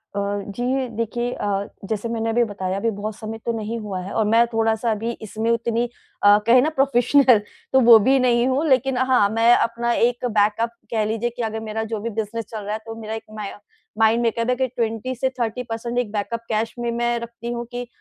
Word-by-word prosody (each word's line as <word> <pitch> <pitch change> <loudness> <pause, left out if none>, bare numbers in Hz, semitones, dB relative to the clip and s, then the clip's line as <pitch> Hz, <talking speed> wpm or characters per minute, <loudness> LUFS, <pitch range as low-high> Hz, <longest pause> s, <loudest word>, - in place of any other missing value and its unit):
अ, - - 0 0.4
जी 255 +1 -1
देखिए 240 +2 -2
अ, - - -5 0.4
जैसे 220 +1 -2
मैंने 225 -1 -1
अभी 240 +1 +3
बताया 190 -1 -3
अभी 230 +3 0
बहुत 215 +1 -4
समय 220 +1 -6
तो 235 - +1
नहीं 220 +2 -4
हुआ 200 -3 -4
है 185 - -7
और 220 - +1
मैं 225 +3 +4
थोड़ा-सा 225 0 0
अभी 225 +2 -2
इसमें 220 +1 -3
उतनी 235 +1 0 0.4
अ, 205 0 +7
कहे 250 +1 +7
ना 305 - +2
प्रोफेशनल 265 -2 +4 0.3
तो 265 - +6
वो 230 -2 +11
भी 265 +6 +3
नहीं 245 -1 +3
हूँ। 270 +4 +1
लेकिन 260 0 +2
हाँ, 255 -6 +3
मैं 230 +2 +4
अपना 235 +1 0
एक 240 +1 +1
बैकअप 210 +2 +2 0.2
कह 220 -2 +1
लीजिए 225 +2 -1
कि 240 +1 -7
अगर 220 0 -2
मेरा 220 +1 -2
जो 215 - -1
भी 230 +3 -3
बिजनेस 225 +1 -4
चल 220 - -5
रहा 210 +1 -3
है 220 - -3
तो 225 - -7
मेरा 220 0 -5
एक 225 0 -5
माय 210 -2 -5 0.5
माइंड 225 +1 +4
में 235 - +3
एक 230 - -7
है 250 - +3
कि 260 +1 0
20 235 +1 -3
से 260 +2 0
30 235 +1 -1
पर्सेंट 235 +1 -4
एक 220 -4 -2
बैकअप 225 +2 -3
कैश 220 +1 -1
में 235 0 -1
मैं 240 0 0
रखती 235 0 -7
हूँ 240 0 -4
कि 245 0 -5
230 Hz, 225 wpm, -22 LUFS, 220-240 Hz, 0.5 s, वो